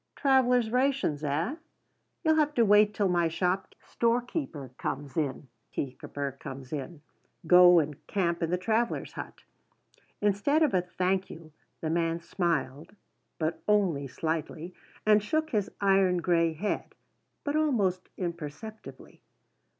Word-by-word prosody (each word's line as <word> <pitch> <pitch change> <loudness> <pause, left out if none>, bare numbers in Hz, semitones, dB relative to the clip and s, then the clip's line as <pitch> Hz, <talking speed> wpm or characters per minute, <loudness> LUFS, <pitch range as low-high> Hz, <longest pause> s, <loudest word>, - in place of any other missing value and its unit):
"Travellers' 250 -4 +3
rations, 255 - +1
eh? 160 - -1 0.7
You'll 315 -1 +4
have 300 -1 +2
to 235 - +4
wait 210 0 +5
till 205 -1 0
my 175 -2 +2
storekeeper 190 - -2
comes 140 0 -4
in. 145 -3 -2 2.0
Go 180 +1 +8
and 150 -3 -1
camp 175 -4 0
in 165 - 0
the 180 - +1
travellers' 225 +5 -1
hut." - - -8 0.8
Instead 210 +10 +2
of 300 - +2
a 185 - +3
thank 185 +1 -1
you 160 -1 -11 0.3
the 160 - -1
man 165 0 0
smiled 170 -3 -2 0.4
but 160 0 -2
only 185 -10 +2
slightly 160 +4 -4 0.3
and 215 0 +5
shook 315 +9 -1
his 210 -4 0
iron 195 -2 +3
grey 170 -1 +2
head 200 +7 -3 0.5
but 290 0 -2
almost 210 -13 +1
imperceptibly. 175 +5 -7
185 Hz, 120 wpm, -29 LUFS, 165-220 Hz, 2.0 s, Go